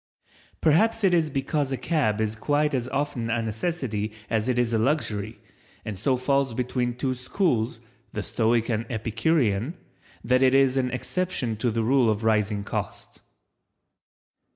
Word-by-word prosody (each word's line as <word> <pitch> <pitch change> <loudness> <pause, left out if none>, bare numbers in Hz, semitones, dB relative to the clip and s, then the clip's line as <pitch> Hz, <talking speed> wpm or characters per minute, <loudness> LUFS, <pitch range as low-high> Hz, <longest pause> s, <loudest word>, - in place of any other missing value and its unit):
Perhaps 220 +8 +3
it 190 -2 +4
is 165 -3 +3
because 135 0 -1
a 135 - -1
cab 125 -5 0
is 110 0 0
quite 150 +5 +1
as 125 -2 -1
often 130 -4 -2
a 115 0 0
necessity 110 -3 -2 0.2
as 110 +2 +1
it 125 - +1
is 120 -1 +1
a 110 - +2
luxury 110 -5 -1 0.5
and 110 - -4
so 130 +5 +2
falls 135 -1 +1
between 125 -1 -1
two 130 +1 -1
schools, 125 - 0 0.3
the - - -3
Stoic 115 0 +1
and 115 -1 -1
Epicurean, 115 - 0 0.5
that 125 +2 +3
it 130 0 +5
is 135 -1 +4
an 130 -2 +1
exception 130 -2 -2
to 120 +3 0
the 115 0 0
rule 125 0 +3
of 110 0 -1
rising 105 -2 +1
cost. - - -5
125 Hz, 155 wpm, -25 LUFS, 110-140 Hz, 0.5 s, it